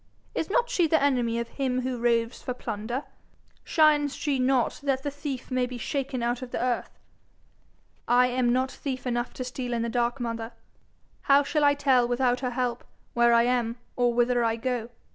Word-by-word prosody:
"Is 325 - -2
not 480 +3 +2
she 350 -8 +2
the 320 0 +3
enemy 245 -5 +1
of 235 0 -2
him 255 -2 -1
who 255 -1 -3
roves 235 -1 +1
for 250 - -4
plunder? 235 +3 -4 0.6
Shines 295 -3 +3
she 285 -3 -1
not 255 -1 +1
that 270 -2 -1
the 285 - -2
thief 280 -3 -6
may 255 -1 +1
be 250 0 -7
shaken 265 0 -3
out 240 +1 -1
of 255 - -6
the - - -3
earth?' 245 -1 -2 1.1
'I 245 +1 +5
am 250 -1 +1
not 260 +2 +1
thief 260 -3 -5
enough 240 0 -1
to 255 - -4
steal 250 0 -4
in 230 -1 0
the 235 - -2
dark, 240 +2 0
mother. 230 -1 -4 0.8
How 280 +1 +7
shall 290 +1 0
I 285 0 +5
tell 265 -4 +3
without 245 0 +1
her 255 - -2
help 245 -1 -2 0.3
where 235 0 +4
I 235 0 +5
am 240 -1 0 0.2
or 245 -1 +2
whither 240 0 +2
I 225 -1 +1
go?' 240 -1 -3
250 Hz, 195 wpm, -27 LUFS, 240-270 Hz, 1.1 s, How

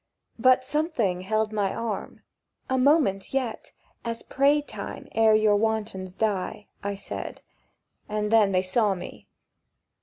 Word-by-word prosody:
But 255 +2 +5
something 255 - 0
held 215 +2 0
my 200 -2 +1
arm. 230 -3 -4 0.5
"A 260 - +3
moment 265 - +2
yet 250 -4 -2 0.3
As 230 0 -3
pray 285 +2 +3
time 295 - -7
ere 220 -1 +5
you 215 -1 +4
wantons 210 -4 -1
die!" 210 -1 -1 0.2
I 200 0 -3
said; 195 - -7 0.7
And 210 0 -1
then 215 -3 +5
they 185 -1 +2
saw 200 +1 +2
me. 180 - -9
215 Hz, 130 wpm, -26 LUFS, 200-240 Hz, 0.7 s, But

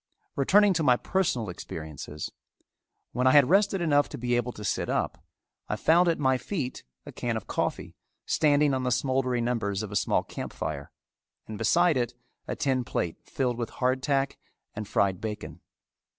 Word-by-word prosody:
Returning 200 +8 +5
to 165 - 0
my 125 -5 +4
personal 145 - 0
experiences: 75 -3 -7 0.8
when 125 +1 +1
I 130 - +6
had 145 -1 +6
rested 195 -1 +3
enough 145 -3 +3
to - - -7
be 120 0 0
able 120 0 0
to 105 - -9
sit 105 - -1
up, - - -1 0.5
I - - 0
found 175 +2 +4
at 165 - +2
my 130 -2 +2
feet 135 -4 -4 0.2
a - - -8
can - - -2
of - - -7
coffee - - -3 0.3
standing 145 -1 +3
on 130 - 0
the 125 - 0
smouldering 125 -1 +1
embers 110 -4 -1
of 105 - -6
a - - -5
small - - +2
camp - - -7
fire, 70 -2 -4 0.6
and 110 - -7
beside 170 +7 +3
it 120 -1 -1 0.3
a - - -2
tin 130 -2 0
plate 85 -7 -2
filled 125 -3 -1
with 120 - -2
hard 130 +1 0
tack 135 -1 0 0.3
and 105 -1 -6
fried 95 -3 +1
bacon. 110 -1 -6
125 Hz, 180 wpm, -27 LUFS, 110-145 Hz, 0.8 s, I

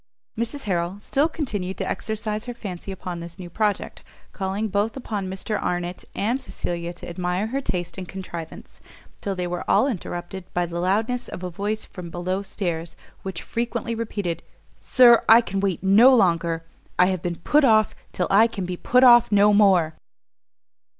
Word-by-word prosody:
Mrs 235 +5 -3
Harrel 180 -1 -1
still 285 +8 +1
continued 205 - -4
to - - -3
exercise 215 0 -3
her 245 -1 -6
fancy 195 -4 -7
upon 180 -2 -6
this 170 +1 -8
new 175 -2 -9
project, 210 +1 -1 0.3
calling 195 +2 -2
both 205 +4 -1
upon 205 -7 -4
Mr 195 +3 -3
Arnott 175 0 -3
and 235 +6 0
Cecilia 175 -9 -4
to 175 - -10
admire 180 +3 -2
her 265 +5 -2
taste 180 -7 -4
and 185 - -6
contrivance; 170 -4 -8 0.4
till 200 -1 -2
they 180 -1 -2
were 175 0 -3
all - - +5
interrupted 180 -5 -5
by 175 0 +2
the 170 0 -5
loudness 220 +7 0
of 180 - -8
a 180 - -4
voice 205 +5 -3
from 180 -2 -9
below 180 +3 -2
stairs, 170 -5 -4 0.3
which 190 -3 -6
frequently 235 0 -3
repeated, 205 -7 -3 0.3
"Sir, 240 -2 +5
I 225 +1 +10
can 195 -4 -2
wait 195 -3 -1
no 225 +7 +7
longer! 170 -5 +2 0.3
I 180 - +6
have 185 -2 -1
been 175 -1 -2
put 290 - +2
off 215 -5 +4 0.2
till 180 - -1
I 215 +4 +6
can 200 -5 -5
be 180 0 -4
put 250 +7 +3
off 240 -2 +7
no 205 0 +5
more!" 190 -6 +4
195 Hz, 175 wpm, -24 LUFS, 175-220 Hz, 0.4 s, I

